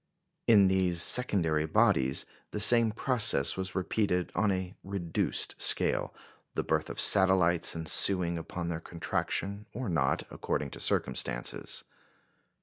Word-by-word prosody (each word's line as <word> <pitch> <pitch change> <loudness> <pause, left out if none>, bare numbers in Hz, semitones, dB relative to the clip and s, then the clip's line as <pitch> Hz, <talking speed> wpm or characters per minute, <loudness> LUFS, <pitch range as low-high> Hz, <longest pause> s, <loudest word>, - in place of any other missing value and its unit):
In 105 -4 +5
these 95 -2 0
secondary 85 -9 +1
bodies 80 - +1 0.2
the 105 - -6
same 115 +1 +4
process 110 - +2
was 95 -1 -6
repeated 95 -1 -2
on 100 +4 0
a 95 -1 -4
reduced 95 -4 -2
scale, - - +3 0.4
the - - -2
birth - - -2
of - - -7
satellites 95 -4 +4
ensuing 85 +2 +3
upon 85 +1 -7
their 80 -1 -4
contraction, 100 +5 -4
or 125 -2 -5
not, 70 -7 -1
according 70 -2 -4
to - - -10
circumstances. 65 - -1
95 Hz, 125 wpm, -28 LUFS, 85-100 Hz, 0.4 s, In